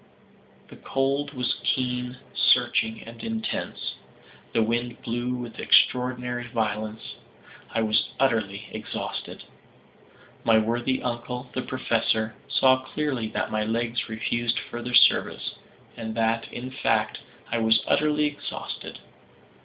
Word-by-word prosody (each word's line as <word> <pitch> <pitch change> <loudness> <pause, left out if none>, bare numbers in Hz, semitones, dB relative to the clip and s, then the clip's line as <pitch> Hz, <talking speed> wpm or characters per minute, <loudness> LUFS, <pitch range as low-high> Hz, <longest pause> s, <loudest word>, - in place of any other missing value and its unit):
The - - -12
cold 140 +2 0
was 125 -1 0
keen, 125 -1 0 0.2
searching 110 0 +3
and 115 0 -10
intense. 225 -1 -3 0.6
The 115 - +3
wind 120 +2 -1
blew 120 +2 -1
with 120 -2 -6
extraordinary 125 -1 +3
violence. 110 -2 -3 0.5
I 115 - 0
was 110 0 +2
utterly 110 -6 +1
exhausted. - - -5 1.0
My 115 -1 +5
worthy 120 +4 +1
uncle, 125 +1 -4
the 130 - -1
Professor, 115 -3 0 0.2
saw 130 0 +5
clearly 130 -4 -2
that - - -2
my 110 0 +1
legs 115 +2 -1
refused 115 +1 0
further 120 +1 -2
service, - - +4 0.4
and 110 -1 -5
that, 115 0 +1
in 125 +2 -6
fact, 130 - +1 0.3
I 115 - +1
was 110 0 +4
utterly 150 0 +3
exhausted. 145 -1 -5
120 Hz, 115 wpm, -26 LUFS, 115-130 Hz, 1.0 s, My